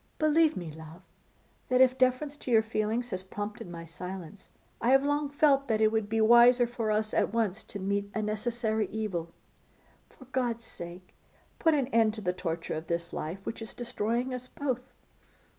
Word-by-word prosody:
Believe 310 Hz, 0 st, +3 dB
me, 170 Hz, -3 st, -5 dB
love, 160 Hz, +3 st, -12 dB, 0.7 s
that 255 Hz, -, +3 dB
if 260 Hz, 0 st, +6 dB
deference 260 Hz, +3 st, +1 dB
to 265 Hz, -, -8 dB
your 225 Hz, -2 st, +5 dB
feelings 225 Hz, +2 st, -1 dB
has 185 Hz, -1 st, -1 dB
prompted 205 Hz, 0 st, -6 dB
my 170 Hz, -1 st, -7 dB
silence, 180 Hz, +2 st, -8 dB, 0.3 s
I 235 Hz, -, +2 dB
have 270 Hz, +1 st, +6 dB
long 290 Hz, 0 st, 0 dB
felt 280 Hz, -1 st, +3 dB
that 220 Hz, -2 st, +1 dB
it 215 Hz, 0 st, +4 dB
would 220 Hz, -2 st, 0 dB
be 225 Hz, +1 st, +1 dB
wiser 240 Hz, +2 st, +7 dB
for 235 Hz, -2 st, -3 dB
us 215 Hz, 0 st, 0 dB
at -, -, +2 dB
once 220 Hz, -2 st, 0 dB
to -, -, -7 dB
meet 200 Hz, +1 st, -1 dB
a 220 Hz, -, 0 dB
necessary 220 Hz, 0 st, -1 dB
evil. 195 Hz, -6 st, -3 dB, 0.8 s
For 260 Hz, -, -16 dB
God's 240 Hz, -3 st, -1 dB
sake, 175 Hz, +1 st, -10 dB, 0.5 s
put 325 Hz, -3 st, +4 dB
an 275 Hz, -3 st, +2 dB
end 225 Hz, -3 st, +3 dB
to 215 Hz, -, -6 dB
the 180 Hz, -2 st, 0 dB
torture 170 Hz, -2 st, -3 dB
of 160 Hz, +1 st, -5 dB
this 170 Hz, 0 st, -3 dB
life, 185 Hz, +6 st, -5 dB
which 225 Hz, -, -5 dB
is 220 Hz, -, -8 dB
destroying 240 Hz, +1 st, -2 dB
us 250 Hz, 0 st, -5 dB
both. 255 Hz, -2 st, -3 dB
220 Hz, 185 wpm, -29 LUFS, 190-250 Hz, 0.8 s, wiser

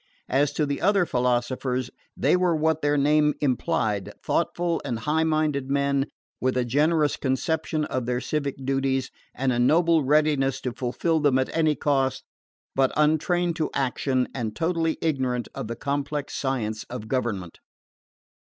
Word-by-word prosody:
As 145 Hz, +2 st, +2 dB
to 150 Hz, -, +1 dB
the 140 Hz, -1 st, -3 dB
other 195 Hz, 0 st, +3 dB
philosophers, 125 Hz, 0 st, -1 dB, 0.3 s
they -, -, +3 dB
were 180 Hz, -2 st, +2 dB
what 160 Hz, 0 st, +1 dB
their 145 Hz, 0 st, +2 dB
name 150 Hz, +1 st, +3 dB
implied: 110 Hz, -7 st, 0 dB
thoughtful 175 Hz, -1 st, 0 dB
and 115 Hz, -, -2 dB
high 150 Hz, +7 st, 0 dB
minded 155 Hz, -4 st, 0 dB
men, 140 Hz, 0 st, +1 dB, 0.3 s
with 130 Hz, 0 st, 0 dB
a 125 Hz, -, +1 dB
generous 150 Hz, +4 st, +2 dB
conception 155 Hz, +3 st, -1 dB
of 130 Hz, -4 st, -3 dB
their 125 Hz, 0 st, 0 dB
civic 140 Hz, 0 st, -2 dB
duties, 135 Hz, -1 st, 0 dB, 0.2 s
and 130 Hz, -1 st, 0 dB
a 120 Hz, -, 0 dB
noble 165 Hz, +5 st, +4 dB
readiness 145 Hz, -1 st, +2 dB
to 125 Hz, -, -2 dB
fulfil 135 Hz, +7 st, 0 dB
them 145 Hz, -3 st, +3 dB
at 130 Hz, -, -1 dB
any 155 Hz, -2 st, +3 dB
cost, 135 Hz, -3 st, 0 dB, 0.5 s
but 135 Hz, -1 st, +3 dB
untrained 165 Hz, +3 st, +2 dB
to 155 Hz, -3 st, 0 dB
action, 130 Hz, -1 st, 0 dB
and 115 Hz, -4 st, -3 dB
totally 165 Hz, -1 st, 0 dB
ignorant 130 Hz, -6 st, 0 dB
of -, -, -5 dB
the 115 Hz, -, -4 dB
complex 145 Hz, +2 st, -3 dB
science 110 Hz, -6 st, -2 dB
of 120 Hz, -3 st, -7 dB
government. 110 Hz, -9 st, -2 dB
140 Hz, 150 wpm, -25 LUFS, 130-155 Hz, 0.5 s, noble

